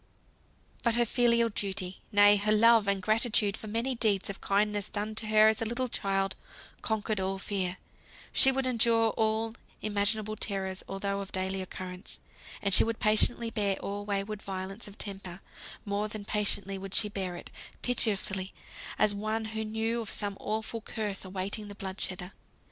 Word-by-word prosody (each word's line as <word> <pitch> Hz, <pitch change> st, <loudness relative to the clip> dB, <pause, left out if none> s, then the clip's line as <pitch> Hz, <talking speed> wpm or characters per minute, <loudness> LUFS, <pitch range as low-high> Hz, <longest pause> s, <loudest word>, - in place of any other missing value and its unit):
But 235 Hz, -2 st, +2 dB
her 240 Hz, 0 st, +3 dB
filial 235 Hz, -1 st, +4 dB
duty, 195 Hz, -3 st, -2 dB
nay, 205 Hz, 0 st, +7 dB
her 205 Hz, +1 st, 0 dB
love 225 Hz, 0 st, +6 dB
and 200 Hz, -1 st, 0 dB
gratitude 215 Hz, -1 st, +2 dB
for 220 Hz, -, -7 dB
many 230 Hz, +5 st, 0 dB
deeds 210 Hz, -5 st, +1 dB
of 195 Hz, -, -11 dB
kindness 205 Hz, 0 st, +1 dB
done 210 Hz, +1 st, -3 dB
to 215 Hz, 0 st, -4 dB
her 215 Hz, 0 st, +6 dB
as 220 Hz, 0 st, +2 dB
a -, -, +1 dB
little 240 Hz, +3 st, -1 dB
child, 195 Hz, -3 st, -1 dB, 0.5 s
conquered 215 Hz, -1 st, -1 dB
all 190 Hz, +1 st, -1 dB
fear. 190 Hz, -2 st, -2 dB, 0.6 s
She 265 Hz, -, +7 dB
would 265 Hz, 0 st, -1 dB
endure 230 Hz, -2 st, +3 dB
all 220 Hz, +1 st, 0 dB, 0.3 s
imaginable 215 Hz, +1 st, 0 dB
terrors, 190 Hz, -3 st, -2 dB
although 200 Hz, +1 st, -2 dB
of 195 Hz, -1 st, -6 dB
daily 190 Hz, 0 st, -1 dB
occurrence. 185 Hz, 0 st, -6 dB, 0.4 s
And 200 Hz, -1 st, +2 dB
she -, -, +10 dB
would 225 Hz, 0 st, -2 dB
patiently 225 Hz, +2 st, +3 dB
bear 200 Hz, -3 st, +1 dB
all 200 Hz, +1 st, -5 dB
wayward 205 Hz, +1 st, -3 dB
violence 195 Hz, +3 st, -5 dB
of 205 Hz, +1 st, -12 dB
temper; 195 Hz, -3 st, -6 dB, 0.5 s
more 205 Hz, +1 st, -1 dB
than 210 Hz, -1 st, -7 dB
patiently 200 Hz, -2 st, +1 dB
would 195 Hz, 0 st, -4 dB
she 220 Hz, -, +6 dB
bear 190 Hz, -3 st, -3 dB
it -, -, -9 dB, 0.3 s
pitifully, 195 Hz, -5 st, 0 dB, 0.4 s
as 210 Hz, -, +3 dB
one 215 Hz, +2 st, -2 dB
who 220 Hz, 0 st, -2 dB
knew 225 Hz, +2 st, -1 dB
of 220 Hz, -, -5 dB
some 200 Hz, -1 st, -3 dB
awful 220 Hz, +1 st, -3 dB
curse 215 Hz, -3 st, -4 dB
awaiting 195 Hz, +3 st, -3 dB
the 205 Hz, -, -9 dB
blood 190 Hz, -1 st, -6 dB
shedder. 180 Hz, 0 st, -3 dB
205 Hz, 170 wpm, -30 LUFS, 195-220 Hz, 0.6 s, she